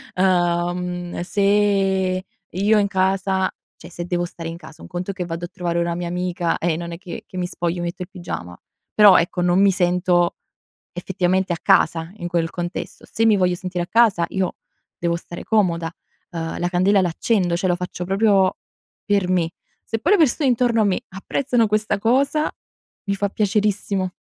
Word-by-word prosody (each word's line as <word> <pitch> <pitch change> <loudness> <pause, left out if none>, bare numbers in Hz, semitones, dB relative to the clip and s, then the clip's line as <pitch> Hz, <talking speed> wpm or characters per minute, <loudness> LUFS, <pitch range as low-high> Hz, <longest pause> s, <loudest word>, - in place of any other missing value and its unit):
Uhm, 175 -1 0
se 195 -1 +1 0.2
io 205 +4 +2
in 200 - +2
casa 190 0 +1 0.3
cioè, 170 - -12
se 175 0 -5
devo 175 0 -1
stare 165 -1 -7
in 165 - -7
casa, 155 -2 -14
un - - -10
conto 180 +2 -4
è - - -8
che 185 -2 -4
vado 170 0 -4
a - - -7
trovare 175 -1 -3
una 170 0 0
mia 175 0 -4
amica 180 -1 -1
e 170 -1 0
non 170 0 -6
è - - -6
che 180 -2 -8
che 185 - -9
mi 180 - -1
spoglio 175 0 -3
e - - -3
metto 170 +1 -5
il 180 - -5
pigiama; 170 - -7 0.4
però 205 -3 +8
ecco 175 +1 0
non 180 +2 +3
mi 200 -1 +5
sento 175 -1 +2 0.6
effettivamente 185 +1 0
a 170 - -3
casa 165 +1 +2
in 175 -4 -5
quel 170 -2 0
contesto. 175 +1 -6
Se 225 - +1
mi 215 -2 +5
voglio 180 -1 +2
sentire 180 -1 -3
a - - -13
casa 215 -7 +3
io 190 -2 -1 0.4
devo 170 0 0
stare 170 0 -9
comoda, 175 -6 +1 0.4
uhm, 165 -1 -4
la 175 - 0
candela 190 +3 +3
l'accendo, 180 +1 0
cioè 185 - -1
lo 175 - +2
faccio 180 0 -5
proprio 195 -1 +3 0.5
per 200 -3 +1
me. 175 -3 +1 0.3
Se 225 - -3
poi 340 - +1
le 410 - +5
persone 285 -2 +3
intorno 240 -2 +2
a - - +4
me 195 -2 +1
apprezzano 230 +5 0
questa 215 -1 0
cosa 275 +7 +2 0.6
mi 200 - +2
fa 200 +1 -1
piacerissimo. 200 -2 0
185 Hz, 190 wpm, -21 LUFS, 175-200 Hz, 0.6 s, però